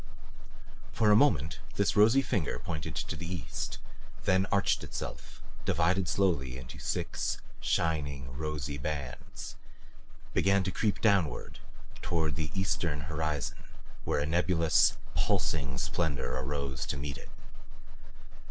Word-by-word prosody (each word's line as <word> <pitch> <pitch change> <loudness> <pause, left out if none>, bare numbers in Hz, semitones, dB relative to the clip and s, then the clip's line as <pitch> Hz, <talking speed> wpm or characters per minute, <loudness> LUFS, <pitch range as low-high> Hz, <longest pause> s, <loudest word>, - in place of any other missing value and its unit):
For 105 -2 +4
a - - +8
moment 85 - +3 0.2
this - - +2
rosy 115 +6 +6
finger 100 - 0
pointed 80 -3 -4
to - - -2
the 85 0 -5
east, 90 -5 -4 0.5
then 95 +1 +3
arched 100 -1 +2
itself, - - -7 0.2
divided 90 +3 +2
slowly 70 -10 +1
into 65 -2 -9
six - - -1 0.2
shining, 70 -5 0
rosy 75 -1 -3
bands; 70 -2 -5 0.8
began 100 0 +4
to 95 - -1
creep 105 +2 0
downward 100 -8 +2 0.4
toward 80 -4 0
the 80 -1 -2
eastern 85 -5 0
horizon 75 -2 -2 0.4
where - - +1
a 70 - +1
nebulous, 85 0 +4 0.2
pulsing 65 -4 +1
splendor 80 0 -1
arose 65 0 -2
to - - -2
meet 70 0 -4
it. - - -12
80 Hz, 120 wpm, -31 LUFS, 70-95 Hz, 0.8 s, a